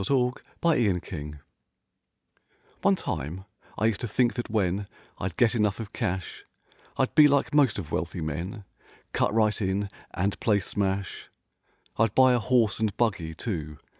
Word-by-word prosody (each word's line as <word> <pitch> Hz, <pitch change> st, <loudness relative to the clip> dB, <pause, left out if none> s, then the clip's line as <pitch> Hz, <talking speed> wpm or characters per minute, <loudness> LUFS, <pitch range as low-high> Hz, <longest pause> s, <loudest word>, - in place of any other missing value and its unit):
IN -, -, -3 dB
WRONG, 125 Hz, -1 st, +2 dB, 0.3 s
AS 165 Hz, -2 st, +4 dB
USUAL 90 Hz, -8 st, -1 dB, 1.5 s
One -, -, +4 dB
time 85 Hz, +8 st, -4 dB, 0.3 s
I 110 Hz, -, +1 dB
used 110 Hz, -2 st, +1 dB
to 120 Hz, -, -2 dB
think 120 Hz, +2 st, +2 dB
that 120 Hz, -2 st, -4 dB
when 100 Hz, -2 st, 0 dB, 0.3 s
I'd 90 Hz, -2 st, -4 dB
get 120 Hz, -1 st, +4 dB
enough 105 Hz, -3 st, +1 dB
of 115 Hz, -1 st, -7 dB
cash 95 Hz, -6 st, -3 dB, 0.5 s
I'd 130 Hz, -, +1 dB
be 150 Hz, -2 st, +8 dB
like 140 Hz, 0 st, +1 dB
most 140 Hz, -7 st, +4 dB
of 80 Hz, -6 st, -6 dB
wealthy 85 Hz, +3 st, -2 dB
men— 85 Hz, +8 st, -4 dB, 0.5 s
Cut -, -, +2 dB
right 110 Hz, 0 st, +2 dB
in 100 Hz, +1 st, -1 dB, 0.2 s
and 100 Hz, +2 st, -1 dB
play 105 Hz, -3 st, +3 dB
smash— 100 Hz, 0 st, -2 dB, 0.7 s
I'd'buy 125 Hz, +4 st, +5 dB
a 120 Hz, -, +3 dB
horse 115 Hz, -1 st, +2 dB
and 110 Hz, -3 st, -1 dB
buggy, 100 Hz, -9 st, 0 dB
too. 80 Hz, -8 st, -4 dB
105 Hz, 155 wpm, -27 LUFS, 95-120 Hz, 1.5 s, be